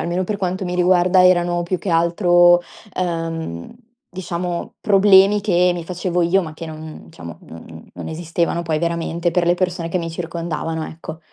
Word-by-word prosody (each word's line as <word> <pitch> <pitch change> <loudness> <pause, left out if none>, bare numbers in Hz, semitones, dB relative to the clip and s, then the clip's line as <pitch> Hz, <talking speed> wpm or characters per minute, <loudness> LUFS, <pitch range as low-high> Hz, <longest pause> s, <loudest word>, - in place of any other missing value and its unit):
almeno 175 +2 -1
per 210 +2 -3
quanto 185 0 -3
mi 180 0 -3
riguarda 180 +1 +4
erano 175 -1 +2
più 180 +1 -2
che - - -7
altro, 175 +1 +4 0.3
ehm, 165 - -4 0.4
diciamo 180 +3 -5
problemi 200 -1 +5
che 180 -3 +2
mi 170 -2 -6
facevo 180 0 -2
io 185 +3 +3
ma 155 -2 -8
che 165 - -8
non 155 - -10
diciamo, 85 0 -10
non 80 0 -12
non - - -7
esistevano 170 +1 -2
poi 160 -2 -1
veramente 170 +1 -2
per 175 +1 +1
le 175 - +4
persone 180 -2 -2
che 185 - 0
mi 165 - -4
circondavano, 165 -1 -4
ecco. 160 0 -9
175 Hz, 170 wpm, -19 LUFS, 165-180 Hz, 0.4 s, problemi